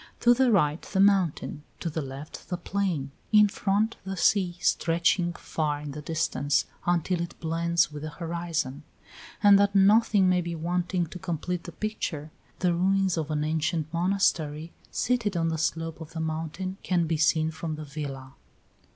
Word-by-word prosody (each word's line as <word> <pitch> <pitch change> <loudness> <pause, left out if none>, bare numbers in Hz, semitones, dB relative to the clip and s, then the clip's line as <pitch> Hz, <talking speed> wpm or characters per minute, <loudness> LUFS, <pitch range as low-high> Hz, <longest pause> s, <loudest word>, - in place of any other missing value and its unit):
To 240 - +6
the 255 0 +3
right, 155 -6 +2
the 190 - -3
mountain; 190 -6 +2 0.2
to - - -4
the 160 0 -2
left, 140 +3 -9
the 180 - -2
plain; 175 -7 -2 0.2
in 210 -1 +7
front, 205 +2 0
the 190 0 -5
sea, 180 -1 +2
stretching 170 +1 +2
far 150 -3 -2
in 145 -1 -6
the 150 +2 -7
distance, 145 -3 0 0.2
until 175 0 +1
it 170 0 -6
blends 165 0 +1
with 150 -1 -7
the 155 - -4
horizon; 165 -3 -3 0.6
and 200 -1 +8
that 200 0 +2
nothing 200 0 +5
may 180 -1 +3
be 170 0 -4
wanting 175 +2 -1
to 180 +3 -9
complete 175 +1 -3
the 175 - -7
picture, 165 -8 -4 0.3
the 180 -2 +1
ruins 190 +1 +2
of 160 -2 -3
an 150 -1 0
ancient 160 0 -1
monastery, 170 -3 0 0.2
seated 230 -7 0
on 165 0 +1
the 160 -1 -2
slope 165 0 -2
of 160 0 -9
the 165 - -4
mountain, 160 +4 -3
can 175 -2 +1
be 160 0 0
seen 155 +1 +2
from 160 0 -4
the 155 0 -7
villa. 140 -2 -6
170 Hz, 170 wpm, -27 LUFS, 155-190 Hz, 0.6 s, and